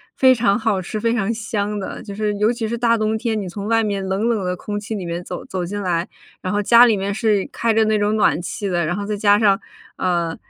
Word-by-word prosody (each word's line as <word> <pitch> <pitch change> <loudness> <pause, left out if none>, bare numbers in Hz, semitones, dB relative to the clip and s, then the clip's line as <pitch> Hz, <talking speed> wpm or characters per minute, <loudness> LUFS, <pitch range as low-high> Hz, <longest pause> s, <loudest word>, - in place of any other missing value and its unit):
非 260 -1 +6
常 235 -3 +2
好 220 -5 0
吃、 205 +4 -5
非 230 +1 +1
常 215 -2 0
香 210 -2 -3
的。 190 - -6
就 200 - -8
是 210 0 -1
尤 210 +3 +3
其 230 -2 -3
是 235 +2 -3
大 230 0 +2
冬 215 0 0
天， 220 -1 -1
你 195 - -5
从 200 +3 -6
外 225 0 +2
面 200 -2 -2
冷 195 +4 0
冷 225 -4 0
的 180 0 -1
空 205 +3 -5
气 215 +2 -5
里 190 -4 -5
面 170 +1 -4
走 - - -7
走 185 -1 -4
进 205 +4 -4
来， 175 -2 -1 0.3
然 185 - -3
后 205 - +1
家 235 +3 +7
里 225 -4 +3
面 195 +1 -2
是 210 -2 +1
开 230 -1 0
着 220 0 +4
那 215 -1 +2
种 205 +1 +1
暖 210 -5 +2
气 200 +3 -4
的， 175 -3 0
然 165 +3 -1
后 200 +1 -4
再 210 +1 -2
加 205 0 +4
上， 200 -2 +3 0.4
呃， 170 -3 0
205 Hz, 285 characters per minute, -20 LUFS, 195-220 Hz, 0.4 s, 家